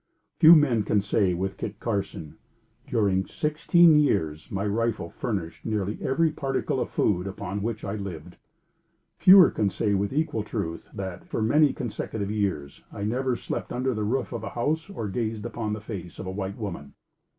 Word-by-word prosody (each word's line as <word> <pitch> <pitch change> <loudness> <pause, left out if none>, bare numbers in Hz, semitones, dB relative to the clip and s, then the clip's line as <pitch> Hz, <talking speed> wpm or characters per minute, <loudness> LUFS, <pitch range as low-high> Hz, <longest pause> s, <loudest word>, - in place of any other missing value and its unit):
Few 165 +1 +10
men 135 -8 +3
can 105 0 +1
say, 100 -2 +1
with 95 +2 -3
Kit 105 -1 -6
Carson, 100 -8 -4 0.5
"During 95 -3 +1
sixteen 155 +1 +4
years, 80 - 0
my 100 +1 -2
rifle 110 -4 -1
furnished 95 -8 -4
nearly 105 -2 -2
every 155 +4 +2
particle 135 -3 -2
of - - -2
food 90 -2 0
upon 100 +1 -5
which 110 0 -3
I 100 - -3
lived." 100 -6 -7 0.8
Fewer 185 -2 +8
can 105 - 0
say 100 +2 -1
with 100 +1 0
equal 145 -6 0
truth, 100 -6 -5
that 95 -2 -6
"For - - -3
many 145 +6 +4
consecutive 105 -2 -4
years, 95 -10 -2
I 100 - -6
never 125 +4 0
slept - - -5
under 130 +1 -1
the 105 -1 -2
roof 125 +6 -1
of 120 - -5
a - - -4
house, 155 +9 -2
or 150 - -4
gazed 110 +1 -3
upon 110 -2 -3
the 105 - -5
face 95 -6 -7
of - - -6
a 95 - -4
white 95 0 -4
woman." 85 -10 -6
105 Hz, 175 wpm, -26 LUFS, 95-125 Hz, 0.8 s, Few